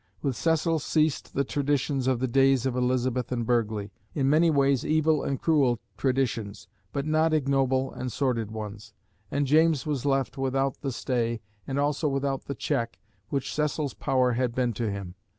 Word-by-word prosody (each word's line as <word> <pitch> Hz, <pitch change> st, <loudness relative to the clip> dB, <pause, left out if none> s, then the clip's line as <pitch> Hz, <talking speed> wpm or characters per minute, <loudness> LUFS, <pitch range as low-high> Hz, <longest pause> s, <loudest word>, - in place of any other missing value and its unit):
With 135 Hz, -4 st, 0 dB
Cecil 165 Hz, +2 st, +1 dB
ceased 155 Hz, 0 st, 0 dB
the 140 Hz, -, +2 dB
traditions 140 Hz, -1 st, 0 dB
of 130 Hz, -2 st, +3 dB
the 130 Hz, -, 0 dB
days 135 Hz, 0 st, +3 dB
of 130 Hz, -2 st, 0 dB
Elizabeth 125 Hz, 0 st, 0 dB
and 120 Hz, -2 st, -1 dB
Burghley, 110 Hz, -4 st, 0 dB, 0.2 s
in 135 Hz, -2 st, +1 dB
many 160 Hz, +4 st, +4 dB
ways 140 Hz, -4 st, +3 dB
evil 155 Hz, -1 st, +2 dB
and 135 Hz, -, -2 dB
cruel 140 Hz, -8 st, +2 dB, 0.2 s
traditions, 125 Hz, -6 st, -1 dB, 0.2 s
but 140 Hz, 0 st, -2 dB
not 155 Hz, +1 st, +2 dB
ignoble 135 Hz, -2 st, +1 dB
and 130 Hz, 0 st, -4 dB
sordid 120 Hz, -6 st, 0 dB
ones; 110 Hz, 0 st, -7 dB, 0.3 s
and 145 Hz, 0 st, 0 dB
James 155 Hz, -1 st, +3 dB
was 145 Hz, -5 st, -2 dB
left 135 Hz, -1 st, 0 dB
without 135 Hz, 0 st, 0 dB
the 135 Hz, -, -2 dB
stay, 120 Hz, -2 st, -1 dB, 0.3 s
and 135 Hz, 0 st, -2 dB
also 145 Hz, +2 st, +1 dB
without 135 Hz, 0 st, -1 dB
the 140 Hz, -, -4 dB
check, 115 Hz, 0 st, -2 dB, 0.3 s
which 140 Hz, -2 st, -2 dB
Cecil's 150 Hz, -1 st, -1 dB
power 130 Hz, -1 st, +1 dB
had 120 Hz, 0 st, -1 dB
been 125 Hz, -2 st, +1 dB
to 110 Hz, +1 st, -2 dB
him. 100 Hz, -3 st, -5 dB
135 Hz, 170 wpm, -27 LUFS, 120-145 Hz, 0.3 s, many